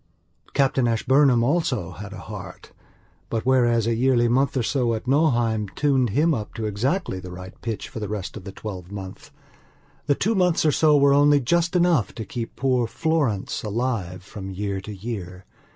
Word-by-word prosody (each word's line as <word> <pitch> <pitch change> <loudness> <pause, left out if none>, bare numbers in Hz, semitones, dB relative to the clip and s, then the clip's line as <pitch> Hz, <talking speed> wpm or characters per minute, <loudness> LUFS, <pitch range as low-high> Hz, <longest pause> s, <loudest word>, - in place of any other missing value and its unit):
Captain 135 -3 +2
Ashburnham 125 +2 +3
also 130 - 0
had 105 +2 -9
a - - -8
heart. - - -9 0.6
But, 115 0 -2
whereas 120 -3 +3
a 115 - +1
yearly 120 0 +3
month 135 +3 +1
or 125 - +1
so 120 -1 +1
at 110 - -6
Nauheim 120 -7 +2
tuned 135 -4 +2
him 150 +10 +2
up 110 -6 -5
to 110 - -3
exactly 110 - -1
the 90 0 -9
right 90 +1 -9
pitch 115 -3 -4
for - - -7
the 105 - -4
rest 105 -3 -5
of 105 - -8
the 100 - -7
twelvemonth, 95 -1 -8 0.8
the 145 - +3
two 220 +10 0
months 180 -5 +2
or 155 - +5
so 150 +1 +4
were 140 0 +5
only 145 0 +5
just 170 +7 +1
enough 170 - +2
to 110 - -5
keep 115 +1 -6
poor 125 -3 +1
Florence 140 -7 -1
alive 105 -5 -3
from 95 0 -8
year 100 0 -3
to 105 - -8
year. 95 -3 -6
120 Hz, 180 wpm, -24 LUFS, 105-140 Hz, 0.8 s, or